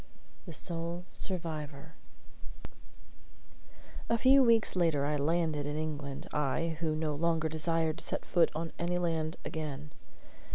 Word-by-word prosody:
THE -, -, -6 dB
SOLE 170 Hz, +6 st, 0 dB
SURVIVOR 160 Hz, -4 st, -4 dB, 2.2 s
A 230 Hz, -, +3 dB
few 265 Hz, +3 st, +6 dB
weeks 230 Hz, -4 st, +4 dB
later 165 Hz, -6 st, +2 dB
I 150 Hz, +1 st, +1 dB
landed 155 Hz, 0 st, 0 dB
in 145 Hz, +1 st, -3 dB
England, 145 Hz, -3 st, -4 dB
I, 150 Hz, +3 st, 0 dB
who 160 Hz, -2 st, 0 dB
no 155 Hz, -1 st, -1 dB
longer 160 Hz, +1 st, +1 dB
desired 160 Hz, +1 st, 0 dB
to -, -, -3 dB
set -, -, -2 dB
foot 170 Hz, -2 st, +3 dB
on 165 Hz, +1 st, -3 dB
any 175 Hz, +1 st, 0 dB
land 165 Hz, -3 st, -1 dB
again. 150 Hz, -2 st, -5 dB
160 Hz, 130 wpm, -32 LUFS, 150-170 Hz, 2.2 s, few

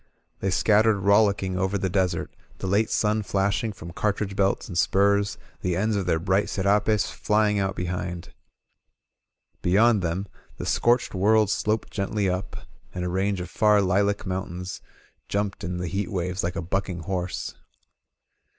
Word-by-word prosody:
They 95 Hz, -, -1 dB
scattered 105 Hz, +3 st, +3 dB
rollicking 100 Hz, -2 st, +3 dB
over 95 Hz, +2 st, 0 dB
the 95 Hz, -, -1 dB
desert, 95 Hz, -1 st, -1 dB, 0.2 s
the -, -, -6 dB
late 100 Hz, +4 st, +2 dB
sun 105 Hz, 0 st, +1 dB
flashing 100 Hz, +2 st, 0 dB
from 85 Hz, -4 st, -10 dB
cartridge 100 Hz, 0 st, -1 dB
belts 100 Hz, -1 st, +1 dB
and 90 Hz, -, -7 dB
spurs, 100 Hz, +4 st, +2 dB, 0.2 s
the 90 Hz, -1 st, 0 dB
ends 105 Hz, +4 st, +1 dB
of 100 Hz, -3 st, -1 dB
their 85 Hz, -2 st, +2 dB
bright 95 Hz, +5 st, +1 dB
serapes 105 Hz, +1 st, +1 dB
flying 105 Hz, -1 st, +1 dB
out 95 Hz, 0 st, -1 dB
be 90 Hz, -, -3 dB
hind. 90 Hz, -1 st, -5 dB, 1.3 s
Beyond 105 Hz, +4 st, +4 dB
them, 90 Hz, +3 st, -2 dB, 0.3 s
the -, -, -5 dB
scorched 120 Hz, +1 st, +2 dB
world 105 Hz, +2 st, +3 dB
sloped 110 Hz, +1 st, -1 dB
gently 100 Hz, 0 st, -1 dB
up, 90 Hz, +1 st, -4 dB, 0.3 s
and 90 Hz, 0 st, -2 dB
a -, -, -1 dB
range 95 Hz, +2 st, 0 dB
of 90 Hz, 0 st, -7 dB
far 105 Hz, -1 st, +4 dB
lilac 100 Hz, +2 st, +1 dB
mountains 90 Hz, -1 st, -4 dB, 0.5 s
jiunped 100 Hz, 0 st, -2 dB
in 90 Hz, -1 st, -3 dB
the 90 Hz, 0 st, -3 dB
heat 100 Hz, +5 st, -3 dB
waves 90 Hz, 0 st, -2 dB
like 85 Hz, +1 st, -2 dB
a 95 Hz, -, -3 dB
bucking 90 Hz, 0 st, -2 dB
horse. 90 Hz, +1 st, -3 dB
95 Hz, 160 wpm, -25 LUFS, 90-105 Hz, 1.3 s, Beyond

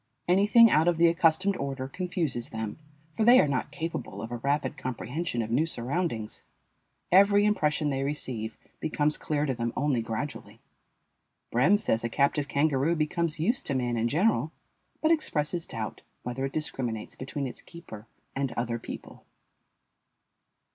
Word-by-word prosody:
Anything 210 Hz, +5 st, +6 dB
out 160 Hz, +2 st, +4 dB
of 175 Hz, -2 st, +3 dB
the 170 Hz, -, +5 dB
accustomed 170 Hz, +3 st, +3 dB
order 135 Hz, -1 st, -3 dB
confuses 170 Hz, -6 st, -2 dB
them, 110 Hz, +1 st, -5 dB, 0.4 s
for 220 Hz, -, +1 dB
they 245 Hz, +3 st, +8 dB
are -, -, +4 dB
not 135 Hz, -3 st, -1 dB
capable 160 Hz, -, -5 dB
of 115 Hz, -, -7 dB
a 120 Hz, -, -3 dB
rapid 140 Hz, +2 st, -1 dB
comprehension 125 Hz, +1 st, -3 dB
of 110 Hz, -, -6 dB
new 150 Hz, +7 st, +2 dB
surroundings. 125 Hz, -4 st, -3 dB, 0.7 s
Every 200 Hz, +2 st, +6 dB
impression 150 Hz, -7 st, +1 dB
they 135 Hz, 0 st, -1 dB
receive 125 Hz, -6 st, -4 dB, 0.2 s
becomes 150 Hz, -1 st, 0 dB
clear 150 Hz, -1 st, -1 dB
to 135 Hz, -, 0 dB
them 115 Hz, -1 st, -2 dB
only 135 Hz, -3 st, +1 dB
gradually. 115 Hz, +6 st, -5 dB, 0.9 s
Brehm 140 Hz, -, +4 dB
says 115 Hz, -, 0 dB
a 120 Hz, -, -1 dB
captive 140 Hz, +3 st, +1 dB
kangaroo 145 Hz, +2 st, +2 dB
becomes 160 Hz, 0 st, -1 dB
used 235 Hz, -, 0 dB
to 140 Hz, -, 0 dB
man 120 Hz, -2 st, 0 dB
in 115 Hz, 0 st, +1 dB
general, 160 Hz, -, +2 dB, 0.5 s
but 315 Hz, -, +4 dB
expresses 170 Hz, -, 0 dB
doubt 110 Hz, -1 st, -5 dB, 0.2 s
whether 125 Hz, +2 st, -3 dB
it 135 Hz, -, -5 dB
discriminates 125 Hz, -8 st, -3 dB
between 135 Hz, +2 st, -4 dB
its 125 Hz, -, -7 dB
keeper 140 Hz, -11 st, -11 dB, 0.3 s
and 135 Hz, -1 st, -1 dB
other 120 Hz, 0 st, -2 dB
people. -, -, -9 dB
145 Hz, 155 wpm, -28 LUFS, 120-170 Hz, 0.9 s, they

